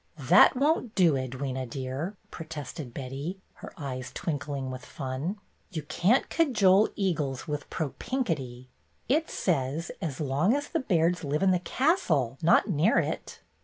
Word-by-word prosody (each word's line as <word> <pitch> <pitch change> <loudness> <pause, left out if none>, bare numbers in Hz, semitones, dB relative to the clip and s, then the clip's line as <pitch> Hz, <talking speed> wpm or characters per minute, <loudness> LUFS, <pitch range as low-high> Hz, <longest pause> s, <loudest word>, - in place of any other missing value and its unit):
"That - - +6
won't 275 -4 +1
do, 175 -5 +5
Edwyna, 130 -1 -3
dear," 135 - -4
protested 155 -4 -7
Betty, 140 +9 -5 0.2
her - - -8
eyes 130 -4 -5
twinkling 140 -3 -3
with 130 0 -7
fun. 140 +8 -4 0.3
"You 160 -5 -5
can't 195 - +2
cajole 215 - +4
eagles 155 - -1
with 150 -1 -4
pro 155 -3 -2
pink 255 -4 -1
itty. 130 -4 -5 0.4
It 310 +6 +2
says, 160 -1 -1
'As 155 -7 -3
long 150 - +2
as 290 0 -3
the 330 - 0
Bairds 175 - +1
live 150 +4 0
in 190 - +5
the 180 - +2
castle,' 170 - +1
not 170 +5 +5
near 180 +3 +3
it." - - -2
160 Hz, 150 wpm, -28 LUFS, 135-195 Hz, 0.4 s, That